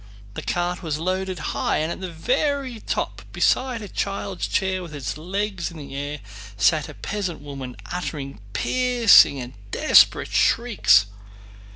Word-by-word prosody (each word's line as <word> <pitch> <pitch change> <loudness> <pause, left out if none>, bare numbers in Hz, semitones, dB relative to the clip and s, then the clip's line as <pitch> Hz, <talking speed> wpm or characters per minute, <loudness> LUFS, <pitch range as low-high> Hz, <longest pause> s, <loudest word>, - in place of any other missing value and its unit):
The - - -5
cart 175 +1 -2
was 160 -4 -2
loaded 185 +2 -2 0.2
high, - - 0
and 155 +2 -1
at - - -6
the 185 - -4
very 260 - -1
top, - - -3
beside 250 -3 +1
a - - -6
child's 195 -1 -3
chair 190 -1 0
with 170 -4 -8
its 140 -3 -4
legs 190 +3 -3
in 170 - -11
the 140 -2 -9
air, 145 +1 -4 0.4
sat 145 +10 +2
a - - -10
peasant 195 -6 -4
woman 135 -3 -8
uttering 140 -9 -5
piercing 245 - +5
and 125 0 -7 0.2
desperate - - +4
shrieks. 200 - +4
180 Hz, 150 wpm, -23 LUFS, 145-205 Hz, 0.4 s, piercing